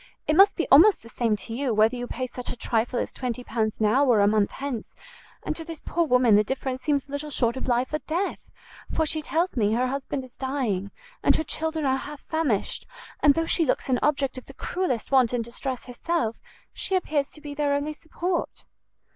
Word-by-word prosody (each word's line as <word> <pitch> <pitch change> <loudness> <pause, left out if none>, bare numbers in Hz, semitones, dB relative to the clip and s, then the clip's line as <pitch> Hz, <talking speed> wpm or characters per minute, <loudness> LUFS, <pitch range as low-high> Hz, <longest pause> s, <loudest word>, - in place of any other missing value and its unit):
It 305 - +2
must 390 +3 +7
be 340 - -1
almost 365 +9 +7
the 230 - -12
same 230 -2 +1
to 220 +3 -6
you 250 -2 -1
whether 220 +3 +4
you 245 0 -4
pay 255 +1 -3
such 250 0 -7
a - - -3
trifle 235 +1 -1
as - - -2
20 250 -1 -4
pounds 220 -2 -2
now 220 +6 +4
or 245 -6 +4
a 200 - +5
month 210 -1 +3
hence, 270 -5 -5 0.6
and - - -2
to 325 - -6
this 325 -2 -7
poor 340 -1 0
woman 250 -5 +5
the 210 - +5
difference 260 +2 -3
seems 285 0 0
little 285 +2 -5
short 240 -4 0
of 260 - -5
life 250 +3 +1
or 305 - +1
death, 340 +7 -3 0.4
for 320 - +1
she 310 +1 -1
tells 335 +4 0
me 215 -3 +2
her 250 +2 +2
husband 275 0 -3
is 255 -1 -14
dying, 250 -8 -2 0.3
and - - +4
her - - +1
children 320 -1 -2
are 265 0 +2
half 290 +1 -8
famished; 305 -11 -1 0.3
and 285 -1 +6
though 330 - +1
she 330 - +2
looks 275 - 0
an 250 -1 +2
object 275 -3 +1
of - - -19
the 275 - -13
cruellest 350 - -2
want 255 -3 +4
and 240 -1 0
distress 245 +2 -5
herself, 245 -2 -2 0.4
she 385 - -1
appears 300 -6 0
to - - -9
be 295 -1 -7
their 285 -1 +1
only 290 +2 -2
support." 340 +3 -3
265 Hz, 220 wpm, -26 LUFS, 240-305 Hz, 0.6 s, must